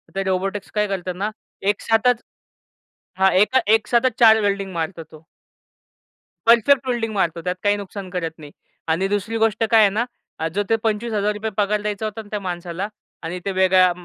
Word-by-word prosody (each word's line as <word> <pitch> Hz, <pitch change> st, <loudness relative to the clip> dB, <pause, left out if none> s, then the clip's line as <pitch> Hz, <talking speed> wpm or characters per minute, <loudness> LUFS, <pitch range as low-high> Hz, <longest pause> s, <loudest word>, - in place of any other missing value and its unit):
ते 195 Hz, -, 0 dB
रोबोटिक्स 195 Hz, +1 st, -2 dB
काय 210 Hz, 0 st, +2 dB
करतात 185 Hz, -2 st, -3 dB
ना, 200 Hz, +4 st, -2 dB, 0.3 s
एकसाथच 225 Hz, +4 st, +2 dB, 1.0 s
हां, 190 Hz, 0 st, +4 dB
एका 210 Hz, +8 st, +4 dB
एकसाथच 235 Hz, +2 st, +2 dB
4 220 Hz, -2 st, +7 dB
वेल्डिंग 200 Hz, -1 st, -1 dB
मारतो 165 Hz, 0 st, -3 dB
तो. 155 Hz, 0 st, -15 dB, 1.2 s
परफेक्ट 240 Hz, +3 st, +5 dB
वेल्डिंग 235 Hz, -3 st, -1 dB
मारतो 170 Hz, -4 st, 0 dB
त्यात 180 Hz, +1 st, -2 dB
काही 205 Hz, 0 st, +3 dB
नुकसान 200 Hz, -1 st, -7 dB
करत 180 Hz, -3 st, -3 dB
नाही. 150 Hz, -3 st, -12 dB, 0.4 s
आणि 165 Hz, +4 st, +1 dB
दुसरी 205 Hz, +3 st, -2 dB
गोष्ट 225 Hz, 0 st, +1 dB
काय 225 Hz, -1 st, +7 dB
आहे 205 Hz, -, +6 dB
ना 235 Hz, -, +2 dB, 0.5 s
जो 205 Hz, +2 st, 0 dB
ते 225 Hz, -, +4 dB
₹25,000 210 Hz, -1 st, -1 dB
पगार 210 Hz, 0 st, +1 dB
द्यायचा 210 Hz, 0 st, -3 dB
होता 215 Hz, +1 st, -4 dB
ना 215 Hz, -, -16 dB
त्या 210 Hz, -, -2 dB
माणसाला 180 Hz, 0 st, -4 dB, 0.4 s
आणि 170 Hz, +3 st, -4 dB
ते 200 Hz, -, 0 dB
वेगळ्या 185 Hz, -1 st, +5 dB
205 Hz, 165 wpm, -21 LUFS, 185-220 Hz, 1.2 s, 4